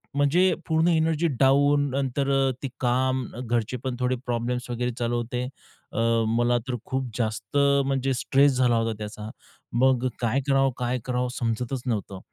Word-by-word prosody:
म्हणजे 165 +6 +3
पूर्ण 160 +1 +2
energy 160 0 +2
down 145 +1 +4
नंतर 135 0 -1
अ, 135 -1 +3
ते 135 - -2
काम 130 +1 +1 0.2
घरचे 120 0 -1
पण 130 -2 -2
थोडे 125 0 +1
प्रॉब्लेम्स 125 +1 -2
वगैरे 125 +1 -1
चालू 120 0 0
होते. 120 +1 -3 0.5
अ, - - -2 0.4
मला 120 0 +3
तर 125 - -1
खूप 130 0 -2
जास्त 110 +1 -2 0.3
म्हणजे 135 -1 0
स्ट्रेस 135 +3 +3
झाला 125 -2 +3
होता 115 0 0
त्याचा. 105 0 -6 0.5
मग 130 -1 +3
काय 120 +2 +1
करावं, 135 0 +3
काय 125 0 -1
करावं 125 0 -1
समजतच 120 +2 -2
नव्हतं. 100 -5 -3
125 Hz, 155 wpm, -25 LUFS, 120-135 Hz, 0.5 s, down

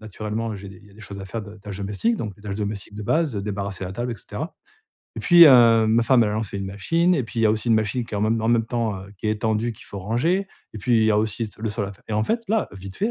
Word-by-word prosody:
naturellement 110 +1 -4
j'ai 100 0 -9
des 95 - -12
il 105 - -20
y - - -18
a - - -19
des 110 - -15
choses 100 -1 -8
à 95 - -6
faire, 115 +4 -4
des 105 +1 -11
tâches 100 -1 -7
domestiques. 105 - -1
Donc 105 -3 -4
les 105 - -19
tâches 100 -1 -4
domestiques 105 -1 -5
de 105 - -5
base, 155 -2 +1
débarrasser 100 -1 -3
la 90 - -5
table 120 +3 -3
et - - -7
cetera. 105 - -7 0.6
Et - - -3
puis 175 -2 +8
heu, 115 -5 +7
ma 115 +2 +4
femme, 120 -2 +5
elle 105 - 0
a - - -2
lancé 110 -2 -3
une 100 - -4
machine 165 - +1
et 140 - +1
puis 115 - -7
il - - +2
y - - +7
a 105 - +4
aussi 110 +2 -2
une 115 - +5
machine 110 +3 0
qui 110 - -8
est 100 - -1
en - - 0
même 110 +1 +1
en 110 - 0
même 115 -1 +3
temps, 115 -4 -1
heu, 100 - -14
qui 110 - -2
est - - +3
étendue, 110 +2 -1
qu'il 110 - -15
faut 100 - -7
ranger, 165 - 0 0.3
et - - -5
puis 120 +3 +2
il 110 - +3
y 110 - +4
a 105 - +3
aussi 110 +2 -1
s 110 - -7
le 110 0 -2
sol 105 -1 -2
à 100 - -8
faire. 95 - -21
Et 110 - -4
en 110 +1 +1
fait, 230 - -1
là, 220 0 +1
vite 95 -1 -9
fait 215 +4 0
110 Hz, 335 wpm, -23 LUFS, 100-120 Hz, 0.6 s, puis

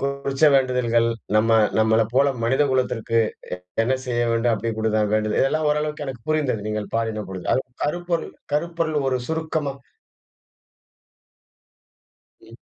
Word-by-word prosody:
குறிச்ச 140 +1 -1
வேண்டுதல்கள் 125 -3 +2 0.3
நம்ம 115 +1 +4 0.2
நம்மளப்போல 110 +5 +3 0.2
மனித 130 +5 +3
குலத்திற்கு 115 -3 0 0.7
என்ன 130 +3 +2
செய்ய 120 -1 0
வேண்டும் 115 +1 +2
அப்படிகூட 110 0 -2 0.3
வேண்டுதல். 110 0 0
இதெல்லாம் 155 +3 +1
ஓரளவுக்கு 150 0 -2
எனக்கு 130 -4 -7
புரிந்தது. 145 -9 0
நீங்கள் 105 -1 -3
பாடின 110 -2 -1
பொழுது. 95 -2 -7 0.4
கருப்பொருள், 175 +2 -2 0.2
கருப்பொருள் 165 0 -1
ஒரு 130 -1 0
சுருக்கமா. 160 -3 -2 2.7
ம். - - -16
130 Hz, 110 wpm, -23 LUFS, 115-150 Hz, 2.7 s, நம்ம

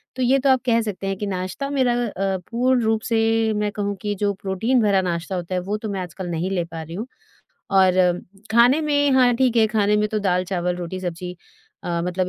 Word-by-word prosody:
तो 255 - -1
ये 265 +3 +4
तो 270 +1 +1
आप 260 -2 +4
कह 230 -2 +3
सकते 200 -3 -4
हैं 195 -1 -2
कि 210 - -3
नाश्ता 185 +8 -4
मेरा 260 -4 +2
अ, 195 -2 -2
पूर्ण 250 +1 +2
रूप 220 0 +1
से 225 -1 +1
मैं 210 0 -1
कहूँ 205 0 -3
कि 205 -1 -2
जो 205 -1 +1
प्रोटीन 225 +6 +1
भरा 200 -2 +3
नाश्ता 175 +1 -3
होता 175 +1 -4
है 180 - 0
वो 210 - 0
तो 215 0 -6
मैं 195 -2 -3
आजकल 180 +1 -6
नहीं 170 +3 -2
ले 180 -3 -1
पा 165 -1 -8
रही 165 +2 -9
हूँ। 220 +6 -5 0.6
और 190 -2 +4 0.6
ख़ाने 240 +7 +5
में 285 -2 +2
हाँ 250 -2 +4
ठीक 250 -2 +2
है, 220 - +5
ख़ाने 210 -1 +2
में 210 0 +1
तो 215 0 -1
दाल, 185 -2 +1
चावल, 180 -1 -2
रोटी, 180 +1 -5
सब्ज़ी 180 0 -5 0.5
अ, 170 -1 -1
मतलब 180 +1 -1
205 Hz, 230 wpm, -22 LUFS, 185-235 Hz, 0.6 s, ख़ाने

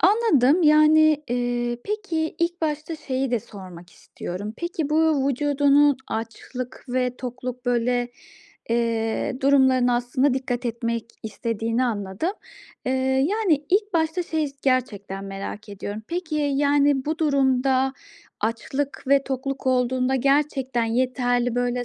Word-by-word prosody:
Anladım. 355 - +4
Yani, 305 0 +5
eee, 240 0 -1
peki 395 -7 -2
ilk 345 +1 -1
başta 310 +1 -2
şeyi 265 -3 -2
de 240 -2 +1
sormak 180 -4 -12
istiyorum; 205 +5 -7
peki, 340 -4 -3
bu 305 -3 +3
vücudunun 285 +1 +3
açlık 235 +3 -6
ve 250 0 -1
tokluk, 250 0 -6
böyle, 245 0 +1 0.6
eee, 230 0 0
durumlarına 260 -3 +4
aslında 255 +3 +1
dikkat 250 -2 -2
etmek 230 0 -2 0.2
istediğini 225 +2 -2
anladım. 205 - -2 0.6
Eee, 255 - +1 0.4
yani, 380 -8 +1
ilk 410 +2 +2
başta, 320 +2 +1
şey, 315 -4 -2
gerçekten 205 -7 -1
merak 195 +2 -7
ediyorum. 205 +1 -6
Peki, 340 -2 -3
yani, 285 -1 +2
bu 310 +1 -2
durumda 265 -3 +2 0.5
açlık 265 +6 -3
ve 275 0 +5
tokluk 265 0 -4
olduğunda 255 0 +1
gerçekten 270 -2 +1
yeterli 245 0 0
böyle 245 0 0
260 Hz, 120 wpm, -24 LUFS, 240-295 Hz, 0.6 s, Yani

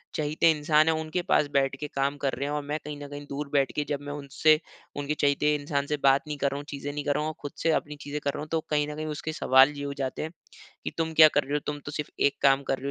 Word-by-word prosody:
चहिते 155 +2 +3
इंसान 155 0 +3
है 160 - +4
उनके 160 +3 -2
पास 150 - +4
बैठ 135 -1 +2
के 150 - -4
काम 140 +1 0
कर 135 -1 -1
रहे 140 - -3
हैं। 145 - -2
और 150 - -2
मैं 150 +2 -3
कहीं 150 -1 -5
न - - -7
कहीं 145 0 -8
दूर 140 +1 -4
बैठ 140 -2 +2
के 150 - +1
जब 145 -1 -2
मैं 145 0 -6
उनसे 150 +2 +2 0.4
उनके 145 +1 -2
चहिते 145 +1 +3
इंसान 145 -1 -2
से 150 - -1
बात 135 0 +5
नहीं 150 -1 -4
कर 140 0 +1
रहा 140 - -3
हूँ 145 - -7
चीज़ें 145 0 -5
नहीं 145 0 -4
कर 145 - +2
रहा - - 0
हूँ, - - -1
और 155 - -7
खुद 145 - -5
से 165 - +3
अपनी 150 -1 -1
चीज़ें 145 +1 -4
कर 140 - 0
रहा - - -5
हूँ 155 - -6
तो 160 -1 +1
कहीं 150 -1 +1
न 150 - -5
कहीं 155 +1 -4
उसके 155 +1 -4
सवाल 130 -3 +5
ये 145 - -5
हो 140 - -3
जाते 130 - -3
है 160 - -4 0.6
कि - - -2
तुम 160 0 0
क्या 155 0 +9
कर 145 - +4
रहे 140 - -6
हो? - - +3
तुम 145 0 -2
तो - - -3
सिर्फ़ 150 -1 -4
एक 140 - +3
काम 135 0 +5
कर 135 - +1
रहे 135 - -6
145 Hz, 310 wpm, -27 LUFS, 140-150 Hz, 0.6 s, क्या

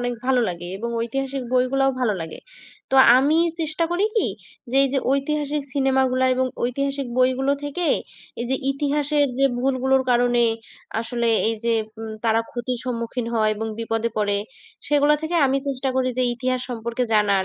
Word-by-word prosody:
অনেক 245 0 -2
ভালো 260 -2 +3
লাগে 175 0 -5
এবং 235 +3 -4
ঐতিহাসিক 270 +3 -3
বইগুলাও 270 +2 +2
ভালো 220 -5 +1
লাগে। 165 - -6 0.5
তো 270 - +2 0.2
আমি 290 +5 +3 0.2
চেষ্টা 320 +1 0
করি 365 +4 +1
কি, 420 - +3 0.4
যে, 265 - 0
এইযে 270 0 0
ঐতিহাসিক 295 +1 -1
সিনেমাগুলা 265 -1 +2
এবং 260 0 +1 0.2
ঐতিহাসিক 275 +2 -2
বইগুলো 260 +2 +2
থেকে 320 +4 -2 0.5
এই 240 - -2
যে 265 - +2 0.2
ইতিহাসের 290 +1 +1
যে 275 - +4
ভুলগুলোর 265 0 +2
কারণে 240 0 +3 0.6
আসলে 235 0 -1 0.2
এইযে 230 +1 -1 0.3
উম 220 -1 -6
তারা 225 0 +3
ক্ষতির 245 0 -3
সম্মুখীন 235 -1 -3
হয় 215 -1 +2
এবং 220 +1 -4
বিপদে 225 0 -1
পড়ে, 205 -1 +1 0.5
সেগুলো 295 0 +4
থেকে 330 +2 -3
আমি 270 +1 +1
চেষ্টা 265 0 -2
করি 255 -1 +1
যে 255 - +3
ইতিহাস 255 +1 -1
সম্পর্কে 235 +1 -2
জানার 200 -3 +3
255 Hz, 160 wpm, -22 LUFS, 235-275 Hz, 0.6 s, যে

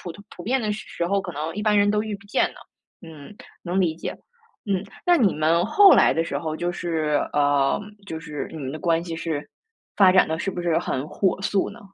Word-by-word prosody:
普 175 - -7
通 200 - -14
普 175 - -9
遍 260 +3 +1
的 210 - -1
时 215 - -7
时 170 0 -3
候 200 0 +1
可 175 -3 -7
能 155 +2 -4
一 210 - -3
般 210 -1 +3
人 205 0 +4
都 210 +1 0
遇 215 -1 -4
不 200 0 -11
见 - - +2
呢。 - - -19 0.5
嗯， 160 +3 -12 0.3
能 180 +2 0
理 165 -3 +1
解。 - - -5 0.5
嗯， 195 -1 0 0.2
那 350 -2 +4
你 205 -6 +3
们 165 +3 +2
后 395 - +7
来 - - +4
的 165 +1 0
时 - - -3
候 155 -1 -4
就 175 +1 -2
是 155 -4 -1
呃， 145 -1 +2 0.3
就 160 - -5
是 150 -3 -6
你 - - -9
们 135 -1 -5
的 155 - -6
关 165 +1 +1
系 165 -2 -5
是 160 -3 -4 0.5
发 190 -3 +6
展 185 - +5
得 160 0 -2
是 195 - -2
不 180 -2 -5
是 170 -2 +2
很 135 +3 -3
火 190 +3 0
速 200 -2 0
呢？ 220 +3 -13
175 Hz, 260 characters per minute, -23 LUFS, 160-200 Hz, 0.5 s, 后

